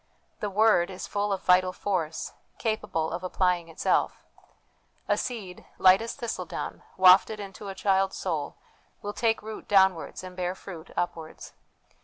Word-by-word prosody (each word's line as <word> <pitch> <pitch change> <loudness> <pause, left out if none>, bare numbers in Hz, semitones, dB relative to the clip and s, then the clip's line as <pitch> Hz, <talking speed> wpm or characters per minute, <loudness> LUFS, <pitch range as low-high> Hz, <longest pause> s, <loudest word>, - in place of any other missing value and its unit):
The 210 - -2
Word 200 -3 +4
is 185 -1 -6
full 205 0 -1
of 195 - -2
vital 185 0 +4
force, 175 -5 -3 0.2
capable 215 -8 -1
of 175 - -3
applying 180 -2 0
itself. 165 - 0 0.8
A - - +3
seed, 205 -8 -5
light 185 +2 +6
as 230 - -4
thistledown, 235 -1 -5 0.2
wafted 190 +3 +6
into 200 0 -8
the 195 -1 -6
child's 195 0 +1
soul, 160 -6 -3 0.5
will 205 0 -4
take 225 -1 0
root 220 0 -8
downwards 190 -4 +3
and 185 0 -9
bear 180 0 -2
fruit 175 -3 -10
upwards. 165 -2 -4
190 Hz, 145 wpm, -27 LUFS, 180-205 Hz, 0.8 s, light